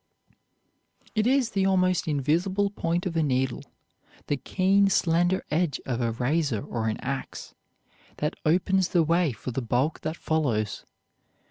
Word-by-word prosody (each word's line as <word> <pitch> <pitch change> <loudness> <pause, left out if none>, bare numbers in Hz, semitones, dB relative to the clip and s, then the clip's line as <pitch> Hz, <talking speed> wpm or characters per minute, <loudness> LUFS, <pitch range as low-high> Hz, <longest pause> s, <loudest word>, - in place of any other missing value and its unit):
It 215 +1 +1
is 260 -3 +2
the 195 -1 +1
almost 185 -3 +2
invisible 170 +8 +1
point 170 -2 -1
of 175 -3 -3
a 165 - +2
needle, 130 -3 0 0.6
the 145 - 0
keen, 195 +6 +2
slender 175 +1 +2
edge 155 -3 0
of 125 -2 -2
a 115 -1 0
razor 125 0 -1
or 115 -2 -3
an 110 - -1
ax, 135 +1 -5 0.6
that 150 +2 -2
opens 185 +3 +2
the 175 -3 +2
way 165 0 +2
for 120 +2 -6
the 130 - -2
bulk 125 +6 0
that 155 +2 -4
follows. 120 -10 -1
160 Hz, 145 wpm, -26 LUFS, 130-185 Hz, 0.6 s, is